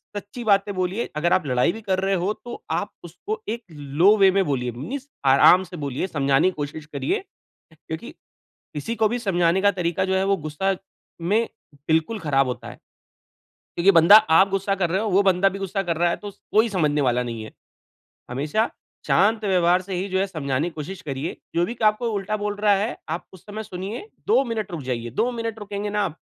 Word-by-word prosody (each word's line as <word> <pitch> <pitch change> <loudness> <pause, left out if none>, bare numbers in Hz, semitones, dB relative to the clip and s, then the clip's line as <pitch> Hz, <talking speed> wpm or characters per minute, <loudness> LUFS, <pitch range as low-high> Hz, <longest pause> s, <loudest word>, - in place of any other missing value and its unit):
सच्ची 205 +4 -6
बातें 200 -2 +2
बोलिए। 185 +5 -2
अगर 170 +3 +2
आप 185 - +2
लड़ाई 125 +5 +2
भी 225 - -8
कर 190 -3 0
रहे 195 +1 0
हो 205 - +1
तो 240 - -8
आप 205 - -1
उसको 180 +6 -6
एक 235 +1 -3 0.4
लो 200 +4 +7
वे 195 -1 +6
में 195 +1 +2
बोलिए, 125 -5 -1
मीन्स 255 - -6 0.2
आराम 140 +7 +6
से 180 - -8
बोलिए, 140 +6 -2
समझाने 140 0 +2
की - - -7
कोशिश 150 +1 -5
करिए। 140 - -2 0.5
क्योंकि - - -8 0.6
किसी 150 +11 -3
को 220 - +3
भी 240 +3 -2
समझाने 180 -4 +2
का 205 - +5
तरीका 170 0 0
जो - - +2
है 190 0 +2
वो 195 0 +2
गुस्सा 190 +6 -1 0.6
में 225 +2 +2 0.4
बिल्कुल 160 +8 +1
ख़राब 135 -6 +1
होता 125 - -5
है। - - -11 1.0
क्योंकि 180 +3 +5
बंदा 170 +6 +8 0.2
आप 195 +1 +5
गुस्सा 195 +1 0
कर 180 -3 0
रहे 190 +4 0
हो, 220 - -1
वो 195 +2 +4
बंदा 190 0 +4
भी 195 +1 -7
गुस्सा 195 0 -2
कर 170 -3 -1
रहा 175 0 +3
है - - 0
तो 205 - -8
स - - -29
कोई 220 +2 +4
समझने 150 -7 +1
वाला 125 -2 +2
नहीं 115 -2 -5
है। 110 - -10 0.8
हमेशा 150 - 0 0.4
शांत 215 +4 +3
व्यवहार 180 -2 +3
से 190 0 -6
ही 185 +2 -2
जो 190 0 0
है 195 - +1
समझाने 150 -4 -2
की 175 - -12
कोशिश 160 +5 -6
करिए। 140 +2 -4 0.2
जो 170 - +3
भी 235 - -6
आपको 215 +2 +2
उल्टा 205 +1 -2
बोल 205 0 -3
रहा 205 0 +3
है, 210 +4 -1
आप 165 +3 -3
उस 185 -2 -15
समय 215 +1 -6
सुनिए, 200 - -6 0.2
2 405 -10 +4
मिनट 220 -4 -3
रुक 160 - -4
जाइए, 120 -2 -3
2 225 - 0
मिनट 230 -2 -4
रुकेंगे 205 0 -4
न 210 - -4
आप, 195 -7 -1
190 Hz, 215 wpm, -23 LUFS, 155-205 Hz, 1.0 s, बंदा